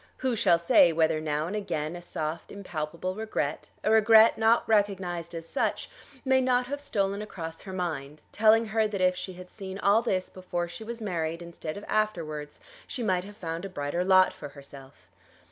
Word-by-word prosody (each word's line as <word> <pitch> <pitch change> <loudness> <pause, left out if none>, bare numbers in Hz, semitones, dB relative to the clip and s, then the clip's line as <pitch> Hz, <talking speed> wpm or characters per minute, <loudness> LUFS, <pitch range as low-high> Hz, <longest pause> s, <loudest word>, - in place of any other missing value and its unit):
Who 260 -2 0
shall 195 -6 +4
say 170 0 +5
whether 160 -1 +2
now 150 0 -1
and 185 +5 -4
again 165 -6 -3
a 175 - -7
soft 160 -2 -5
impalpable 175 -2 -4
regret, 205 -8 -3
a 215 - +2
regret 220 0 +7
not 225 +1 +3
recognised 185 -5 0
as 165 0 -7
such, - - -2 0.3
may 260 0 +4
not 250 -1 +2
have 285 +3 -5
stolen 200 -6 -1
across 165 -6 -7
her 195 - -8
mind, 155 -5 -4
telling 220 +2 +4
her 220 0 +2
that 205 -2 -4
if 185 0 +3
she 185 +1 -6
had 180 0 -12
seen 190 -2 -7
all 200 +3 +4
this 190 -6 -1
before 175 -2 -3
she 175 +6 -9
was 230 +1 -7
married 170 -4 -2
instead 170 -1 -7
of 205 - -8
afterwards, 160 -9 -2 0.3
she 250 - -4
might 185 -4 +1
have 205 +1 -12
found 165 -1 -5
a 195 - -5
brighter 145 +1 -2
lot 185 0 +5
for 145 - -9
herself? 140 -1 -14
185 Hz, 190 wpm, -28 LUFS, 165-215 Hz, 0.3 s, regret